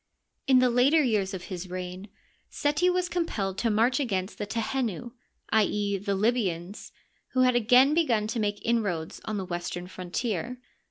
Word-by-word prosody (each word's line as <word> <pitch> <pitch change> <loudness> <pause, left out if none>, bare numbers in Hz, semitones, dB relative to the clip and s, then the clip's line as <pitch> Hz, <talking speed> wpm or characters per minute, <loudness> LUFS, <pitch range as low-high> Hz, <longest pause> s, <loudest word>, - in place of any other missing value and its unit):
In 265 -1 +6
the 255 -1 +4
later 275 +6 +4
years 210 -6 +1
of 180 - -7
his 185 -1 -6
reign 185 +2 -6 0.4
Seti 300 +5 +1
was 360 0 +1
compelled 225 - -2
to 235 - +1
march 230 +5 +2
against 195 -7 -2
the 205 - -3
Tehenu 235 0 -2 0.2
— - - -38
i. 220 -1 +5
e., 200 -1 -1
the 200 0 -1
Libyans, 200 -4 -1 0.4
who 255 - +3
had 250 -1 +4
again 250 +5 +5
begun 250 -10 +2
to 230 +2 -3
make 205 -1 -2
inroads 200 -9 -1
on 215 - -3
the 190 - -3
western 175 0 -4
frontier. 190 +5 -4
215 Hz, 170 wpm, -27 LUFS, 190-250 Hz, 0.4 s, In